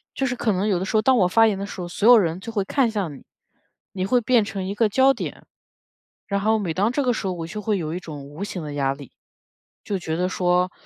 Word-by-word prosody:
就 270 - 0
是 250 -1 -1
可 225 -2 0
能 190 +3 0
有 185 -4 +1
的 190 - -2
时 215 - 0
候 215 - +2
当 260 -1 +4
我 180 - +4
发 225 +5 +5
言 205 -3 +1
的 200 - -4
时 195 - -8
候， 175 - -4
所 210 +6 +2
有 245 - +10
人 170 -3 +1
就 225 +3 -7
会 205 -3 0
看 250 +3 +1
向 195 -9 -3
你， - - -14 0.7
你 185 -1 -3
会 250 +3 +3
变 230 -1 +3
成 200 -2 -5
一 200 - -3
个 215 0 +2
焦 265 +5 +4
点。 - - -7 0.8
然 200 -2 -1
后 220 +1 +2
每 175 -6 -2
当 205 +7 +1
这 285 +2 0
个 250 -1 +2
时 200 - -3
候 185 - -1
我 165 -2 -5
就 210 +4 -6
会 210 -1 0
有 160 -2 -3
一 180 - -3
种 150 -5 -9
无 150 +7 -7
形 180 -5 -5
的 145 -1 -6
压 135 -1 0
力， 140 -3 -12 0.7
就 200 -2 -3
觉 160 -2 -3
得 180 +1 +1
说， 180 0 +1
200 Hz, 300 characters per minute, -23 LUFS, 175-220 Hz, 0.8 s, 有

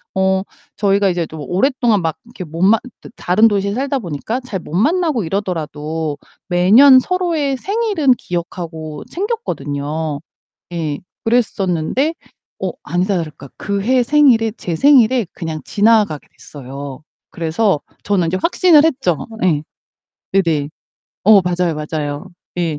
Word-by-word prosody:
어 190 0 +2 0.4
저희가 200 -1 +2
이제 175 -3 -1
좀 155 -1 -9
오랫동안 235 0 +1
막 160 -1 -2
이렇게 235 -5 -9
못 165 +2 -4
만 215 +3 +5 0.2
드 - - -11
다른 215 +6 +3
도시에 200 -1 0
살다가 275 +2 -1
보니까 175 - -4
잘 245 -7 -5
못 155 - -11
만나고 305 - +1
이러더라도 160 -4 -3 0.3
매년 220 +10 +7
서로의 330 -4 -1
생일은 395 - +1
기억하고 165 -3 -6
챙겼거든요. 155 - -3 0.5
예. 155 -4 -2 0.3
그랬었는데 225 - 0 0.5
어 - - -1
아니다 185 +3 0
다를까 150 -5 -6
그해 210 +6 +1
생일에 240 -5 +4
제 170 - -3
생일에 255 - +4
그냥 160 -3 -5
지나가게 210 -7 +2
됐어요. 140 0 -9 0.3
그래서 170 +2 0 0.2
저는 195 -4 +1
이제 180 +3 0
확신을 340 -3 +5
했죠. 215 - 0 0.2
예. 160 -5 +2 0.7
네네. 165 -7 +1 0.6
어 210 0 +7
맞아요, 180 -1 0
맞아요. 150 +1 -4 0.3
예. 165 -4 -1
190 Hz, 290 characters per minute, -18 LUFS, 160-245 Hz, 0.7 s, 매년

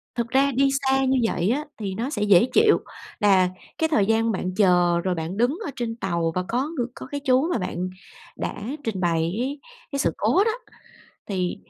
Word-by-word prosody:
Thực 235 -1 -1
ra 270 +3 +3
đi 275 +2 +3
xa 270 0 +2
như 265 0 +2
vậy 175 +4 0
á, 290 +5 0 0.2
thì 195 -3 -3
nó 240 +7 -3
sẽ 210 -7 -3
dễ 200 -2 +6
chịu. 430 0 +5 0.4
Là 190 -3 +4 0.3
cái 320 - +2
thời 215 -11 +2
gian 225 +1 +2
bạn 185 -2 -3
chờ, 180 -3 +3
rồi 185 -1 +1
bạn 165 +3 -4
đứng 250 - +1
ở 295 - -3
trên 230 -2 -3
tàu 170 -6 -1
và 180 - 0
có 255 +5 0
người 245 -3 0
có - - -9
cái 285 0 -3
chú 260 +5 +3
mà - - +1
bạn 180 -1 -3 0.5
đã - - -3 0.3
trình 205 -5 -2
bày 170 -2 +1 0.2
ấy, 275 +4 -3 0.3
cái 280 - -2
sự - - +2
cố 390 - +3
đó, 450 - +2 0.8
thì 185 -3 -2
225 Hz, 210 wpm, -24 LUFS, 185-270 Hz, 0.8 s, dễ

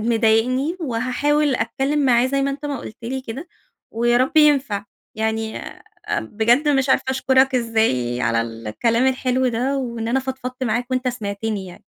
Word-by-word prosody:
مضايقني 245 +7 +2
وهاحاول 285 +2 0
أتكلّم 270 +6 -1
معاه 240 -1 +4
زي 275 +1 0
ما 275 0 0
أنتَ 285 +2 -6
ما 285 -2 -2
قُلت 215 - -9
لي 260 +3 -3
كده، 265 +7 -7 0.4
ويا 240 +1 +2
رب 265 +6 +1
ينفع. 275 -9 +3 0.3
يعني 220 0 -2 0.6
بجد 235 +7 +1
مش 275 -2 +2
عارفة - - +3
أشكرَك 265 0 +3
إزاي 220 - 0
على 115 -1 +1
الكلام 115 - 0
الحلو 255 0 +1
ده، 250 +4 0
وإن 235 -4 -3
أنا 255 +3 +2
فضفضت 260 -1 -5
معاك 245 +2 -1
وأنتَ 255 0 0
سمعتني 210 -3 -3
يعني. 180 -1 -13
250 Hz, 155 wpm, -21 LUFS, 225-265 Hz, 0.6 s, معاه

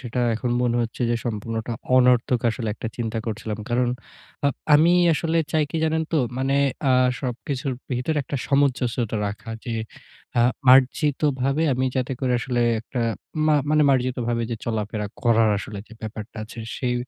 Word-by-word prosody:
সেটা 125 0 -3
এখন 120 +2 -2
মনে 120 -1 +1
হচ্ছে 115 +1 -4
যে 120 - +2
সম্পূর্ণ 115 0 -3 0.4
অনর্থক 125 -1 +4
আসলে 115 -1 -4
একটা 115 - -5
চিন্তা 115 -1 -2
করছিলাম। 110 -1 -4
কারণ 120 +1 +1 0.6
আ - - +5 0.3
আমি 165 +4 +6 0.2
আসলে 165 +2 -1 0.2
চাই 155 -1 +3
কি - - -3
জানেন 160 0 +1
তো? 160 - +3 0.2
মানে 135 +1 +1 0.4
আ - - +5 0.3
সবকিছুর 130 +2 -3 0.2
ভিতরে 125 +6 -1
একটা 135 +2 -4
সামঞ্জস্যতা 125 -5 +1
রাখা 105 +3 -6
যে 115 - -3 0.6
আ - - +5 0.3
মার্জিতভাবে 135 +2 +3
আমি 130 +1 0
যাতে 130 0 -1
করে 130 -2 +1
আসলে 120 0 -1 0.2
একটা 120 +2 -5 0.5
মা 155 - +4 0.2
মানে 155 0 +4
মার্জিতভাবে 125 -2 0
যে 115 - -2
চলাফেরা 105 -2 -2 0.2
করার 115 -2 +4
আসলে 100 +1 -7
যে - - -16
ব্যাপারটা 110 +1 -7
আছে 115 +2 -12 0.2
সেই 125 -2 0
125 Hz, 160 wpm, -23 LUFS, 115-135 Hz, 0.6 s, আমি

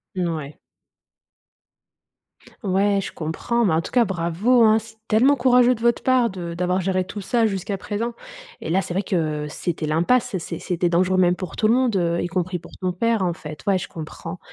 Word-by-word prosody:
N 180 -2 0
ouais. 155 -3 -5 2.1
Ouais, 200 +1 +2
je - - -6
comprends, 215 +9 -1
mais 170 - +2
en 160 - +2
tout - - -8
cas, 245 -2 +4
bravo 190 +7 +2
hein! 220 0 +6
C'est 220 0 -13
tellement 250 +6 +4
courageux 250 -2 +4
de 225 - -12
votre 235 0 +2
part 255 -2 +3
de 175 -3 -6
d'avoir 180 +2 0
géré 185 0 0
tout 200 +3 -7
ça 230 +4 +1
jusqu'à 195 0 -3
présent. 225 +5 -3 0.5
Et - - -5
là, 190 +4 +2
c'est 175 - -5
vrai 195 - +1
que 155 -4 -1
c'était 160 0 -3
l'impasse. 175 +9 +1
C'est 165 -1 -6
c'était 175 -1 -1
dangereux, 185 +2 +2
même 180 -1 +4
pour 185 0 -7
tout 215 - +2
le 225 - +4
monde, 250 -4 +2
heu, 170 -2 +1
y - - -1
compris 180 0 -2
pour - - -14
ton 185 - 0
père, 225 +1 +1
en 175 - 0
fait. 150 -2 -9
Ouais, 195 - +4
je - - -6
comprends 165 +2 -8
185 Hz, 205 wpm, -22 LUFS, 170-225 Hz, 2.1 s, hein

